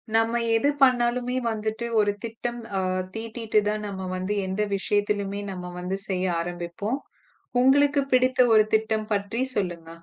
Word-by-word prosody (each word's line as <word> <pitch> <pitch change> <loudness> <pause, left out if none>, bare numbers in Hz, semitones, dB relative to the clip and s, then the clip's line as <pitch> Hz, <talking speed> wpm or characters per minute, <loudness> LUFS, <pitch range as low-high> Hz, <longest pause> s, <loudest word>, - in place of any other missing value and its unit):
நாம 225 +1 +3 0.2
எது 280 +6 +2
பண்ணாலுமே 250 -1 +2 0.2
வந்துட்டு, 220 +1 -3
ஒரு 205 -1 +3
திட்டம் 235 +1 -4 0.2
ஆ - - +2 0.4
தீட்டிட்டு 225 -1 0
தான் 215 0 -2
நம்ம 190 -2 -5
வந்து 185 +3 -2
எந்த 190 +3 -1
விஷயத்துலயுமே 205 0 -1
நம்ம 180 -1 -6
வந்து 180 +2 -2
செய்ய 185 -1 -1 0.2
ஆரம்பிப்போம். 175 +8 -3 0.6
உங்களுக்குப் 280 +1 +4
பிடித்த 255 0 +3
ஒரு 215 -1 +7
திட்டம் 220 0 0
பற்றிச் 225 +6 -1
சொல்லுங்க? 175 -5 -2
215 Hz, 140 wpm, -25 LUFS, 195-240 Hz, 0.6 s, ஒரு